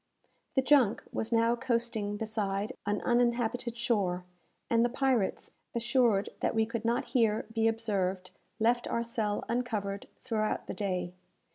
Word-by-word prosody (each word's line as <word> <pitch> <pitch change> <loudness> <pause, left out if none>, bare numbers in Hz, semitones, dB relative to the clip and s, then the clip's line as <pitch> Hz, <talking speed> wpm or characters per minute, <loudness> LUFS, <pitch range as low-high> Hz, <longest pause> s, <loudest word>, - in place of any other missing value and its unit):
The 265 - +3
junk 255 -5 +4
was 225 - -2
now 230 0 +4
coasting 230 -4 -1
beside 210 0 -2
an 205 0 0
uninhabited 240 0 +1
shore, 195 -6 0 0.4
and 230 0 +3
the 240 - +3
pirates, 250 -5 0 0.2
assured 235 -4 +2
that - - 0
we 220 0 +3
could 230 0 -4
not 235 +1 0
here 225 -4 +2
be 225 0 +2
observed, 195 -5 -1 0.3
left 240 +2 +2
our 235 - 0
cell 220 -3 -2
uncovered 215 -4 -2 0.2
throughout 220 -4 -1
the - - -5
day. 185 -3 -2
225 Hz, 140 wpm, -31 LUFS, 205-240 Hz, 0.4 s, junk